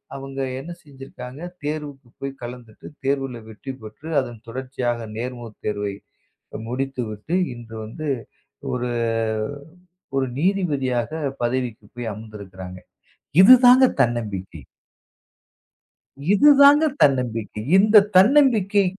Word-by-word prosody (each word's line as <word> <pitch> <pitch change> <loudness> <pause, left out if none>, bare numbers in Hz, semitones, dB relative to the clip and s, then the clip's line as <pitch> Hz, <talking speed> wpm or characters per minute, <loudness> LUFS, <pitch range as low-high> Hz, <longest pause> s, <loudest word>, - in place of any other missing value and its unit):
அவங்க 135 0 -7 0.2
என்ன 165 +6 -8
செஞ்சிருக்காங்க? 135 -1 -11 0.2
தேர்வுக்குப் 145 -4 -6
போய் 135 0 -4
கலந்துட்டு, 120 -2 -10 0.2
தேர்வுல 135 -3 -1
வெற்றி 120 +5 -8
பெற்று, 110 +9 -10
அதன் 120 -4 -6
தொடர்ச்சியாக 120 -2 -3
நேர்முகத் 120 -2 -6
தேர்வை 105 -1 -2 0.7
முடித்துவிட்டு, 125 - -3 0.2
இன்று 115 -1 -10
வந்து 150 +8 -7 0.7
ஒரு 125 -1 -2 1.3
ஒரு 130 -1 +1
நீதிபதியாகப் 145 -6 -1
பதவிக்கு 120 -3 -2
போய் 120 -1 -5
அமர்ந்திருக்கறாங்க. 95 -4 -10 0.6
இதுதாங்க 255 +4 +8 0.2
தன்னம்பிக்கை. 105 - -2 1.7
இதுதாங்க 285 +6 +7 0.2
தன்னம்பிக்கை. 115 -6 +1 0.2
இந்தத் 210 0 +6
தன்னம்பிக்கை 210 -3 +5
130 Hz, 90 wpm, -22 LUFS, 115-155 Hz, 1.7 s, இதுதாங்க